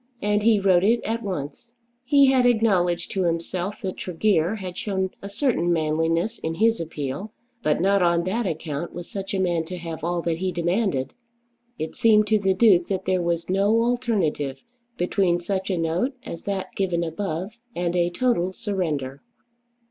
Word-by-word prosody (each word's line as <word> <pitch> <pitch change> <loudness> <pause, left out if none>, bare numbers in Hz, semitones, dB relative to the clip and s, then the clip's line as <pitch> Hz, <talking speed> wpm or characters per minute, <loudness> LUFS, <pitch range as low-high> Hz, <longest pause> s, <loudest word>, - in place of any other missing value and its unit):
And 210 0 +1
he 220 -1 +4
wrote 190 -2 +4
it 230 +4 +4
at 230 +1 -2
once. 190 - -6 0.3
He 280 +2 +5
had 255 -2 +4
acknowledged 185 -7 +2
to 195 - -1
himself 175 +4 -2
that 190 -1 -3
Tregear 180 0 +1
had 185 -4 -6
shown 190 -1 -2
a 200 - -7
certain 200 - +1
manliness 165 +6 0
in 160 0 -3
his 225 +5 +3
appeal; 155 +4 -4 0.3
but 155 - +1
not 195 +2 +3
on 170 -1 +3
that 205 +5 -1
account 160 -1 -4
was 175 -1 -6
such 195 -1 -5
a - - 0
man 175 -3 +1
to 180 +2 -6
have 165 -2 -7
all 170 0 -1
that 165 -1 0
he 185 0 -1
demanded! 175 - 0 0.6
It 155 - -4
seemed 220 -3 +5
to 215 -1 +4
the 195 -1 +1
Duke 185 -6 +5
that 190 -2 -2
there 185 -1 +1
was 170 -1 -1
no 200 +5 +3
alternative 215 - -1 0.3
between 180 -1 +1
such 190 +2 -3
a 185 - 0
note 170 - 0
as 170 - -7
that 190 -2 -3
given 180 -3 0
above 185 +5 -4 0.2
and 175 0 -1
a 175 -1 +2
total 185 -2 0
surrender. 155 - -3
185 Hz, 175 wpm, -24 LUFS, 170-210 Hz, 0.6 s, He